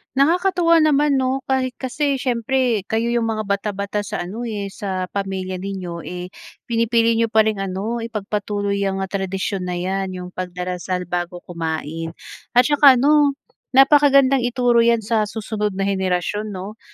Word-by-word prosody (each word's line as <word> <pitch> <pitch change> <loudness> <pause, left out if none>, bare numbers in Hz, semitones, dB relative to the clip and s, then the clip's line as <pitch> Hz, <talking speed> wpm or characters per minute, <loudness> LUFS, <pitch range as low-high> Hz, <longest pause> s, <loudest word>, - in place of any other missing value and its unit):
Nakakatuwa 335 +3 +3
naman, 295 -2 +3
'no? 260 +1 -1
Kahit, 260 -2 -1
kasi, 280 +2 -1
siyempre, 245 -4 0
kayo 230 +2 0
yung 235 -1 +1
mga 215 -1 -2
bata-bata 200 0 -2
sa 205 -3 -4
ano, 225 +7 -5
eh, 205 -3 -4
sa 185 -2 -4
pamilya 190 -2 -3
ninyo, 185 -3 -5
eh, 180 +1 -6 0.3
pinipili 230 0 +2
niyo 230 - +3
pa 220 0 +4
ring 215 -2 -1
ano, 195 +5 -3
ipagpatuloy 205 -2 -2
yang, 195 -1 -1
ah, 190 - -6
tradisyon 190 -1 -2
na 180 - -2
'yan, 190 +2 -2
yung 180 0 -7
pagdarasal 180 0 -4
bago 175 0 -4
kumain. 165 -1 -4 0.4
At 245 - +7
'tsaka 285 -1 +6
ano, 285 +2 +4 0.4
napakagandang 275 -1 +6
ituro 245 -1 +2
'yan 230 -1 +3
sa 215 0 +1
susunod 210 -2 -3
na 195 - -1
henerasyon, 190 +1 -1
'no? 200 +2 -7
210 Hz, 150 wpm, -21 LUFS, 190-245 Hz, 0.4 s, At